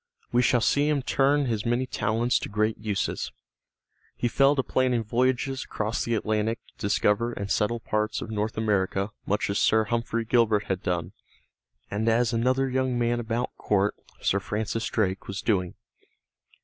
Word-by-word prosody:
We 120 - +4
shall 125 0 +3
see 145 +7 +2
him 145 -3 +1
turn 140 +2 +2
his 110 -4 -1
many 120 +2 +1
talents 115 +1 0
to - - -5
great 110 +1 0
uses. 105 -2 -2 0.8
He 120 - 0
fell 135 +4 +4
to 135 - +1
planning 125 -3 +1
voyages 130 +4 0
across 110 +2 -2
the 115 - 0
Atlantic 110 +1 0
to - - -30
discover 105 +2 +1
and 100 -2 -4
settle 110 +3 +1
parts 110 -1 -1
of 110 - -6
North 110 +1 -2
America 100 -2 0 0.2
much 105 +2 +1
as 100 - 0
Sir 110 0 +4
Humphrey 115 +1 -1
Gilbert 110 -3 +3
had 95 -1 -2
done, 90 -2 -2 0.8
and 110 +3 0
as 120 +1 +2
another 130 +3 +2
young 130 -1 0
man 120 0 +1
about 120 +1 -2
court, 105 0 +1 0.3
Sir 100 - +2
Francis 110 +3 -2
Drake, 95 -3 -1
was 100 0 -4
doing. 90 -5 0
115 Hz, 165 wpm, -26 LUFS, 105-120 Hz, 0.8 s, We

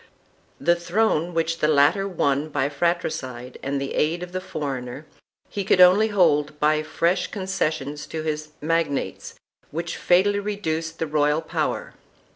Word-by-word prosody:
The 175 - +3
throne 175 -1 +1
which 165 0 0
the 150 - +2
latter 155 +7 +4
won 150 -5 0
by 140 -2 0
fratricide 140 -6 -2
and 140 +1 -2
the 135 0 -4
aid 165 +3 0
of 180 - -8
the 185 0 -3
foreigner, 140 -6 -5 0.4
he 200 - -4
could 185 - +2
only 185 +4 +7
hold 150 -8 +2
by 155 0 +3
fresh 170 +3 0
concessions 155 -7 -3
to 160 -1 -5
his 155 -1 -3
magnates 165 -2 -1 0.3
which 170 +2 -4
fatally 200 +3 +3
reduced 165 -6 -3
the 165 - -1
royal 150 +1 +1
power. - - -2
160 Hz, 145 wpm, -24 LUFS, 150-180 Hz, 0.4 s, only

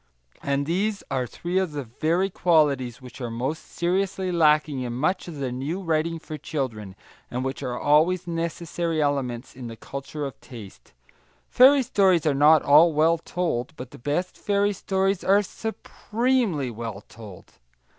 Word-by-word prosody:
And 140 0 -1
these 200 +6 -1
are 130 -2 -1
three 175 +9 -2
of 185 -5 -2
the 145 -1 -3
very 165 - 0
qualities 140 -9 +1
which 125 +1 -11
are 120 - -3
most 130 +7 -4
seriously 185 +1 -1
lacking 150 -4 +3
in 120 -1 -4
much 155 +11 -1
of 170 - -7
the 135 -3 -3
new 140 +9 -3
writing 165 -2 -1
for 155 -1 -8
children, 110 -10 -4 0.3
and 125 +1 -3
which 135 +1 -4
are 125 -3 -3
always 160 +5 +3
necessary 170 -1 -3
elements 135 -5 -2
in 125 -2 -7
the 115 - -8
culture 140 +4 -6
of 135 - -8
taste. 100 - -12 0.6
Fairy 270 +2 +6
stories 190 -7 +3
are 150 - +3
not 150 +2 +5
all 155 +4 +6
well 160 +2 +3
told, 160 -7 -3
but 125 -2 -9
the - - -12
best 145 +8 -2
fairy 205 0 +1
stories 195 0 -1
are 200 +2 +4
supremely 220 - -2
well 110 -3 -6
told. 95 - -13
155 Hz, 160 wpm, -25 LUFS, 130-180 Hz, 0.6 s, Fairy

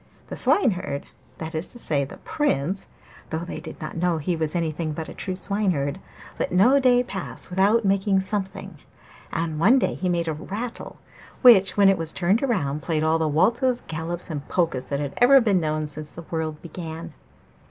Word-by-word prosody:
The - - -5
Swineherd 185 - +1 0.3
that 160 0 -6
is 160 +2 -2
to - - -10
say, 150 -11 0
the - - -11
Prince 190 - -1 0.4
(though 160 +1 -3
they - - -6
did 160 - -9
not 155 - -6
know 175 0 +1
he 165 +3 -1
was 160 0 -2
anything 160 -1 -1
but 160 +1 -5
a - - -8
true 185 - -4
Swineherd) 185 -7 0 0.4
let - - -1
no 235 +10 +5
day 250 -2 +4
pass 190 -4 -7
without 205 +5 +3
making 195 0 +2
something, 190 0 -4 0.5
and 165 -2 -2
one 225 +11 +6
day - - +1
he 185 - -2
made 170 -1 0
a 160 - 0
rattle 210 +10 -6 0.5
which, 210 -7 +7
when 200 -1 +6
it 195 -2 +4
was 160 -1 -2
turned 190 +6 +1
round, 165 - 0
played 155 +1 -1
all 160 +1 +2
the 160 - +1
waltzes, 240 - +2
galops, 165 +2 -4
and 145 -2 -5
polkas 160 -8 -1
which 140 0 -1
had 140 -1 -4
ever 265 +3 +7
been 210 -6 +2
known 155 -1 -1
since 150 0 -7
the 170 - -9
world 160 -2 -2
began. 165 -1 -7
175 Hz, 190 wpm, -24 LUFS, 155-200 Hz, 0.5 s, which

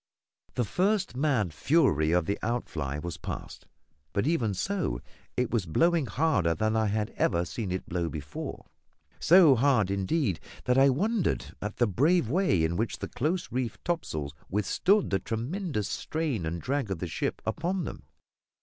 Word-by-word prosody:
The 125 - +1
first 190 - +1
mad 125 - +1
fury 80 - +3
of 90 -1 +3
the 100 - -1
outfly 80 - -2
was 80 +1 -5
past; - - -7 0.5
but, 100 - +1
even 125 - +1
so, 165 - -1 0.4
it 125 -1 0
was 110 -7 0
blowing 165 - +2
harder 115 - +2
than 110 +5 0
I 110 -1 +2
had 105 +1 -1
ever 85 -1 +2
seen 100 +1 -4
it 95 - -3
blow 85 -1 -1
before; 75 -1 -6 0.5
so 170 -3 +7
hard, 125 -6 +3
indeed, 100 - 0 0.2
that 125 +1 +3
I 135 +1 +7
wondered 205 - 0
at 105 +1 -4
the 120 - +4
brave 135 - +2
way 160 - +2
in 85 +2 0
which 115 +2 -1
the - - -5
close 170 +7 -1
reefed 125 -3 -3
topsails 80 - -2 0.2
withstood 180 - +2
the 95 - +2
tremendous 125 - -3
strain 140 - -2
and 85 +2 -3
drag 135 - -1
of 95 - -2
the 90 - -4
ship 85 - -2
upon 175 +10 -1
them. - - -7
115 Hz, 165 wpm, -28 LUFS, -, 0.5 s, so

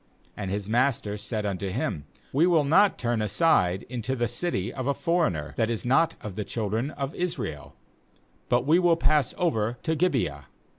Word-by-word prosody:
^And 100 -3 -4
his 100 +1 -3
master 115 -3 +1
said 105 +1 -3
unto 100 -1 -2
him: 90 - -3 0.3
'We 155 +6 +4
will 165 -4 +4
not 190 +8 +4
turn 120 -2 -1
aside 100 - +2
into 125 +2 -3
the 120 -2 0
city 120 - -2
of 130 0 -4
a 140 - +1
foreigner, 125 - 0
that 115 -1 +1
is 115 0 -3
not 135 +7 +3
of 105 - -6
the 105 - -3
children 110 +5 -2
of 140 -1 -5
Israel; 80 - -4 0.7
but 120 +1 +2
we 160 +5 +5
will 175 -2 +4
pass 150 -5 +2
over 120 - 0
to 160 -1 0
Gibeah.' 125 - 0
120 Hz, 180 wpm, -26 LUFS, 105-155 Hz, 0.7 s, we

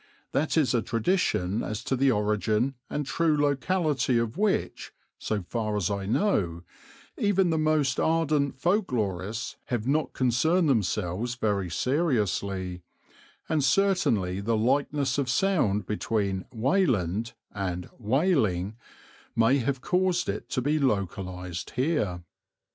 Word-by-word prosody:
That 155 +4 0
is 145 -5 +3
a 120 - +2
tradition 115 - 0
as 105 0 -4
to 135 - 0
the 135 +1 +3
origin 105 +3 +1 0.2
and 150 - -2
true 155 +3 +1
locality 145 -2 +1
of 115 -1 -1
which, 205 +1 -1 0.3
so 105 -3 -2
far 105 +2 -2
as 100 -1 0
I 100 -1 -3
know, 95 - 0 0.6
even 195 -6 +2
the 160 - +1
most 155 -4 +2
ardent 155 -4 +1
folk 185 +6 +1
lorists 105 -1 -2
have 120 -3 -2
not 145 +3 0
concerned 145 +8 +2
themselves 105 -1 0
very 100 -6 -1
seriously, 100 - -1 0.7
and 155 -3 +1
certainly 135 - +2
the 115 +2 0
likeness 140 +3 +1
of 135 -3 -1
sound 130 - +1
between 100 -2 -1
"Weyland" 115 - +1 0.2
and 90 -3 -3
"Wailing" 110 - +1 0.6
may 115 +5 +4
have 130 +1 -1
caused 180 +1 +1
it 100 +2 -4
to 125 - -1
be 150 +3 +1
localized 90 - -2
here. 125 - 0
120 Hz, 125 wpm, -27 LUFS, 100-150 Hz, 0.7 s, may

